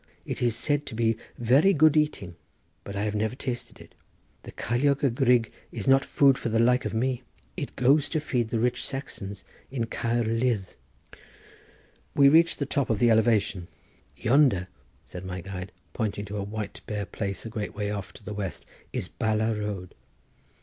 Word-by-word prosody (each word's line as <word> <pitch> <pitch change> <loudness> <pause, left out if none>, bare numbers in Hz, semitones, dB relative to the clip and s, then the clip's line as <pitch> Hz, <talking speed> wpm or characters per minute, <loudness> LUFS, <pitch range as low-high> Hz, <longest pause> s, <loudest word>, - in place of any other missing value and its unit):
"It - - -4
is 120 -2 +2
said 145 +4 +1
to - - -6
be 115 0 +2 0.2
very 135 - +4
good 155 -1 +5
eating, 150 - 0 0.5
but 100 - -7
I 100 - -1
have 105 -1 -1
never 110 +3 -1
tasted 125 -2 -5
it. - - -15 0.5
The - - -10
ceiliog 140 +5 0
y 140 - +5
grug 120 -2 +3 0.2
is 110 - -5
not 135 +1 +6
food 135 -2 +4
for - - -2
the 115 - +1
like 125 +2 +3
of - - -2
me. 125 +2 0 0.3
It - - -5
goes 140 +3 +3
to 160 - 0
feed 125 -6 -1
the 115 - -1
rich 120 +2 0
Saxons 100 -7 -6 0.3
in 125 -4 -2
Caer 115 +1 -1
Ludd." 115 -2 +1 1.5
We 140 -1 +7
reached 165 +3 +5
the 140 - -1
top 140 -1 0
of 110 - +2
the 120 +2 +4
elevation. 110 -5 +2 0.5
"Yonder," 115 - +3 0.4
said 90 - -8
my 90 0 -5
guide, 95 0 -7 0.2
pointing 105 -3 -2
to 105 +1 -5
a 100 - -2
white 105 +1 -5
bare 105 -1 -3
place 100 +2 -4
a - - -4
great 105 -1 -4
way 105 0 -2
off 100 -1 -5
to - - -14
the 105 - -6
west, 100 -3 -5 0.3
"is - - -2
Bala 110 +1 0
road." 105 -4 -4
115 Hz, 185 wpm, -27 LUFS, 105-130 Hz, 1.5 s, We